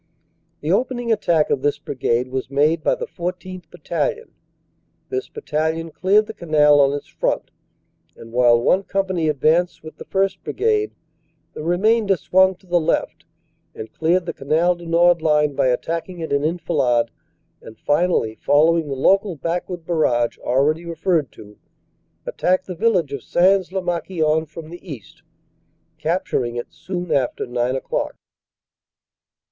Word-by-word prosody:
The 155 - -1
opening 240 +3 0
attack 170 -8 +2
of 135 - +1
this 145 +1 +1
Brigade 125 -1 -1
was 130 0 -4
made 150 +4 +2
by - - +2
the - - -5
14th. 180 -1 -6
Battalion. 455 - -3 0.8
This 395 0 -3
Battalion 160 - -2
cleared 200 +6 +3
the 220 - -8
Canal 150 -6 +4
on 140 -1 +5
its 145 - -4
front, - - -2 0.7
and 115 - -12
while 120 -1 +4
one 180 +10 +3
Company 190 -5 -1
advanced 155 +5 +1
with 155 - -11
the - - -10
1st. 195 -1 0
Brigade 425 0 0 0.6
the - - -7
remainder 200 +4 +2
swung 190 +2 +3
to 190 - -26
the 175 -1 +2
left 155 - -1 0.5
and 110 - -8
cleared 170 +3 +1
the - - -4
Canal 160 +6 +1
du 175 -1 -11
Nord 170 0 +4
line 150 -2 +2
by 130 - +1
attacking 165 +7 -2
it 160 -3 -3
in 140 0 +1
enfilade, 130 -8 +1 0.5
and 110 - -12
finally, 145 -8 0
following 160 +2 +3
the 140 - -3
local 195 +7 +2
backward 170 +3 -4
barrage 125 -9 +1
already 145 +6 +1
referred 170 -3 -1
to, 105 0 -14 0.7
attacked 185 +1 0
the 185 - -6
village 180 -6 +1
of 140 - -4
Sains 185 +4 +2
lez 190 -1 -2
Marquion 160 -3 0
from 155 +1 -10
the 175 - -10
east, 145 - -10 0.8
cap 170 +4 -1
turing 120 -1 -2
it 120 - -8
soon 180 -1 -5
after 135 -4 0
nine 125 +1 -1
o - - 0
clock. - - -3
165 Hz, 150 wpm, -21 LUFS, 145-185 Hz, 0.8 s, on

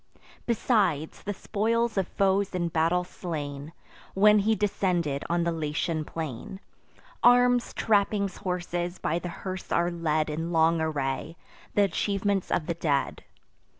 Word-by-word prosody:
Besides, 205 - +1
the 205 - -3
spoils 230 +3 0
of 190 -3 0
foes 195 0 +1
in 175 -1 0
battle 165 +2 +2
slain, 150 -5 -6 0.4
When 210 +2 +6
he 220 +2 +2
descended 180 -8 0
on 170 0 +1
the 170 - +1
Latian 155 0 -2
plain; 160 +4 -6 0.6
Arms, 245 0 +5
trappings, 200 -2 +1
horses, 175 -1 -3
by 165 +3 -1
the 175 - -5
hearse 185 +2 -7
are 175 +1 +2
led 155 -2 0
In 160 +2 -3
long 165 0 +3
array—th' 150 +3 -4
achievements 200 -1 +1
of 155 - 0
the 170 - -1
dead. 150 -4 -1
175 Hz, 130 wpm, -27 LUFS, 160-200 Hz, 0.6 s, When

